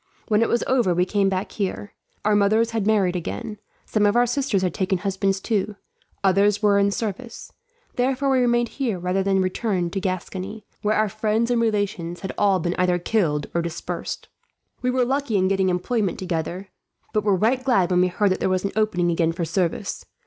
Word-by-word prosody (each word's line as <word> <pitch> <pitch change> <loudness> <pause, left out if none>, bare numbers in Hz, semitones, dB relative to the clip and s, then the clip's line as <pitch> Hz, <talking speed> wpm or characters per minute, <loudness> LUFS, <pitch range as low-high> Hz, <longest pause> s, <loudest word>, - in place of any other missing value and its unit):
When 210 0 +3
it 230 - +2
was 235 - +1
over 235 -9 +2
we 180 +1 +2
came 200 0 +1
back 190 +1 -2
here. 205 0 -4 0.3
Our 210 0 +4
mothers 215 +3 +3
had 220 -3 -1
married 195 -5 +2
again. 205 +4 -5 0.3
Some 210 -1 +2
of 205 - +1
our 240 0 +5
sisters 245 -6 0
had 180 -3 0
taken 190 0 0
husbands, 195 +1 -1
too. 210 0 -1 0.5
Others 200 +2 +3
were 200 -1 +4
in 200 0 +3
service. 225 +3 -5 0.4
Therefore 265 +2 +1
we 260 - +3
remained 240 -1 +2
here 245 -8 -2
rather 180 +2 0
than 190 0 +2
return 185 -2 -1
to 195 - -2
Gascony, 190 +2 -4 0.2
where 215 +1 +1
our 215 0 +2
friends 215 +3 0
and 235 -1 +2
relations 205 -6 -1
had 190 - -5
all 200 -2 +3
been 175 +1 -1
either 180 -1 +3
killed 170 -6 0
or 170 - +1
dispersed. 170 -1 -5 0.5
"We 250 - 0
were 250 0 +2
lucky 270 -4 0
in 185 0 +2
getting 190 -1 +2
employment 195 +3 -1
together, 180 +1 -4 0.4
but 215 - +1
were 205 -2 +3
right 235 +7 +1
glad 195 -9 +2
when 180 0 +4
we 180 - +4
heard 195 +2 +1
that 185 - 0
there - - 0
was 185 +1 0
an 200 - -1
opening 180 -5 +1
again 165 -1 +1
for 170 0 -2
service. 170 +1 -2
200 Hz, 200 wpm, -23 LUFS, 185-220 Hz, 0.5 s, our